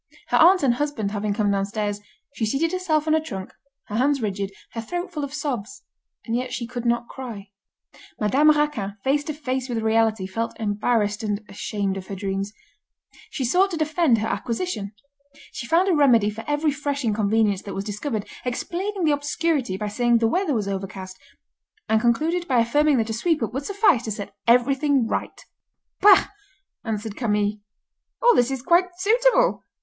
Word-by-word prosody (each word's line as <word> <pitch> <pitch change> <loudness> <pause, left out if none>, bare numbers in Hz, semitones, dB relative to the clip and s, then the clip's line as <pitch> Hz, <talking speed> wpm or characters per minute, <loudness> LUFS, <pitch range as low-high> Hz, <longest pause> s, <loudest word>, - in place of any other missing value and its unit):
Her - - +3
aunt 355 +1 +6
and 255 -3 +4
husband 245 -6 -2
having 205 0 -2
come 205 0 +1
downstairs, 205 +1 -2 0.3
she 240 - -4
seated 275 +9 +1
herself 325 -5 0
on 310 - +3
a 315 - +3
trunk, 190 -11 -7 0.3
her 210 - -4
hands 275 +3 +2
rigid, 200 -3 -3 0.2
her 230 - -4
throat 350 - -4
full 300 -3 -3
of 280 - -4
sobs, 270 -6 -4 0.4
and 230 - -2
yet 250 +1 -2
she 240 - -3
could 240 0 -5
not 235 0 +1
cry. 220 -7 -8 0.7
Madame 270 +9 +4
Raquin, 295 -10 +1
face 285 +2 +2
to 310 - -3
face 260 -3 -3
with 240 - -2
reality, 220 -2 +2
felt 225 +6 -4
embarrassed, 210 0 0
and 210 -1 -2
ashamed 195 0 -3
of 190 - -8
her 200 - -5
dreams. 195 +1 -3 0.8
She 265 - -3
sought 365 +10 +3
to 345 - -4
defend 310 -4 +2
her 215 +1 -1
acquisition. 230 - -3 0.6
She 235 - -6
found 340 +7 +3
a 380 - +3
remedy 240 -9 +4
for 225 +2 -8
every 295 +1 +1
fresh 285 -1 -3
inconvenience 210 -2 +1
that 200 - -7
was 195 - -3
discovered, 210 +1 -4 0.2
explaining 360 +10 -3
the 310 - +3
obscurity 290 - 0
by 210 +1 -3
saying 240 +2 +2
the 225 0 +2
weather 320 - 0
was 210 -3 -1
overcast, 190 -1 -5 0.7
and 220 0 +2
concluded 320 +10 +1
by 255 - +2
affirming 290 +4 +3
that 225 -1 0
a - - -2
sweep 310 +5 0
up 225 - -3
would 270 +2 -3
suffice 400 - +3
to 220 - -3
set 200 -1 -6
everything 265 +2 +3
right. - - -4 0.5
"Bah!" 400 -2 +6 0.5
answered 215 -2 -4
Camille, 210 -3 0 0.6
"all 485 -1 +5
this 245 +1 +3
is 265 -2 -4
quite 345 +5 +4
suitable. - - +3
240 Hz, 180 wpm, -23 LUFS, 210-300 Hz, 0.8 s, aunt